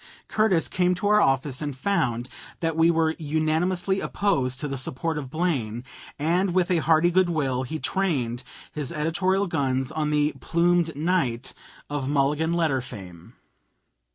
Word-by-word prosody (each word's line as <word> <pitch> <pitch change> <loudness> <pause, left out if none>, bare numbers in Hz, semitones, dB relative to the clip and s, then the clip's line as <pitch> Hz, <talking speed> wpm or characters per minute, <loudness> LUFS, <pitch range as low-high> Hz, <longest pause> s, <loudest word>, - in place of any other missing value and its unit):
Curtis 215 -6 +2
came 180 0 +1
to 195 +3 -2
our 210 0 +5
office 135 -2 +1
and 145 -3 -4
found 130 - 0 0.3
that 165 -1 -1
we 165 +1 +4
were 160 -1 +2
unanimously 160 +5 0
opposed 130 -14 0
to 145 - -2
the 140 - -3
support 160 +5 -2
of 145 -3 -5
Blaine, 130 -8 -1 0.3
and 175 +5 +1
with 185 -1 +2
a 175 - +3
hearty 160 +2 +3
good 185 0 +3
will 135 -6 0
he 130 +5 -4
trained 135 -11 -1 0.3
his 150 -2 -3
editorial 185 +5 0
guns 135 -6 -1
on 155 -1 -1
the 150 0 +2
'Plumed 170 -1 +1
Knight' 145 -6 -1 0.3
of 145 -2 -3
Mulligan 145 +3 +1
letter 160 -6 +1
fame. 90 -8 -11
155 Hz, 155 wpm, -25 LUFS, 135-175 Hz, 0.3 s, our